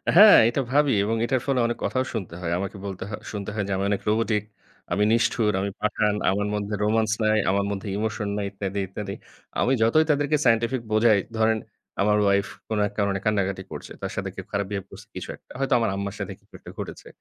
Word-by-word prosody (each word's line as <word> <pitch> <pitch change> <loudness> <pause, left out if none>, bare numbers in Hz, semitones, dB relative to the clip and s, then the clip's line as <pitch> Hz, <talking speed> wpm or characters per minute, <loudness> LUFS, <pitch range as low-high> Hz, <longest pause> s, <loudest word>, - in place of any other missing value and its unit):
হ্যাঁ, 205 +3 +10
এটা 140 - 0
ভাবি 145 -1 +4
এবং 110 +2 0
এটার 130 +1 0
ফলে 135 -2 +1
অনেক 120 0 -1
কথাও 130 0 0
শুনতে 95 -7 -4
হয়। 85 -2 -2
আমাকে 100 +1 -4
বলতে 95 -2 -5
হয় 100 - -5
শুনতে 105 -1 -5
হয় 105 -2 -1
যে, - - -3
"আমি 95 - -1
অনেক 100 - 0
রোবটিক 110 -1 +1 0.5
আমি 105 - +2
নিষ্ঠুর, 115 -2 +2
আমি 100 - -1
পাষাণ, 105 0 +1 0.2
আমার 105 +1 0
মধ্যে 105 0 -3
রোমান্স 110 0 +2
নাই, 110 0 +3
আমার 100 +1 +2
মধ্যে 100 +1 -4
ইমোশন 110 -1 -2
নাই 100 - -1
ইত্যাদি, 100 0 -4
ইত্যাদি।" 100 +1 -5 0.5
আমি 125 - +2
যতই 155 +8 +4
তাদেরকে 145 +1 +2
সায়েন্টিফিক 115 +2 +2
বোঝাই, 110 -1 +5 0.2
ধরেন 110 0 +3 0.4
আমার 105 +1 +3
ওয়াইফ 100 0 +3 0.2
কোন 110 - -2
এক 105 - -11
কারণে 100 -1 +1
কান্নাকাটি 100 -3 0
করছে। - - -8
তার - - -3
সাথে - - -3
কেউ - - -7
খারাপ 100 0 0
বিহেভ 100 -2 -3
করছে - - -12
কিছু - - -6
একটা। - - -24
হয়তো 135 -1 +1
আমার 115 - +1
আম্মার 100 0 -4
সাথে - - -4
কিছু - - -35
একটা - - -11
ঘটেছে। - - -7
105 Hz, 215 wpm, -25 LUFS, 100-115 Hz, 0.5 s, হ্যাঁ